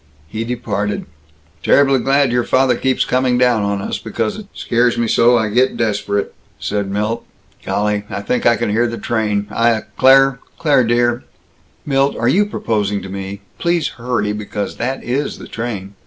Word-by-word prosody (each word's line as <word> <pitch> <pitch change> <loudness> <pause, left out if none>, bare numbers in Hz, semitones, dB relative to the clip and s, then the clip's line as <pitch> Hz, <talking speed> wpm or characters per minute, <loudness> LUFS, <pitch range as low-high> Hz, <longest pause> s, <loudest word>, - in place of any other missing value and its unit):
He 110 +6 -4
departed. 105 -4 -3 0.6
"Terribly 135 -2 +4
glad 135 -1 +2
your 120 0 +1
father 130 0 +3
keeps 130 +2 +1
coming 125 -1 +1
down 125 -3 +3
on 100 -1 -1
us, - - -3
because 115 -2 -3
it 210 -2 -9
scares 120 0 +1
me 115 - +1
so 120 +2 +4
I 110 -2 0
get 125 +5 +2
desperate," 100 -3 -1 0.3
said 100 -1 -2
Milt. 105 +3 -2 0.4
"Golly, 105 0 -1
I - - -4
think 125 - 0
I 120 - +5
can 115 -2 -1
hear 120 +3 +2
the 115 0 -5
train. 105 -4 -1
I, 115 0 +2
uh, 110 - -2 0.2
Claire, 135 0 +5 0.2
Claire 145 -6 +3
dear 120 +1 +1 0.3
" - - -37
"Milt, 135 -1 +1
are 120 - 0
you 200 +11 +3
proposing 105 - -1
to 95 - -7
me? 100 +1 -6 0.2
Please 170 -3 +1
hurry, 120 -4 -2
because 105 -1 -5
that 130 +3 -3
is 135 +4 -2
the - - -10
train. 105 -4 -5
120 Hz, 180 wpm, -18 LUFS, 105-130 Hz, 0.6 s, I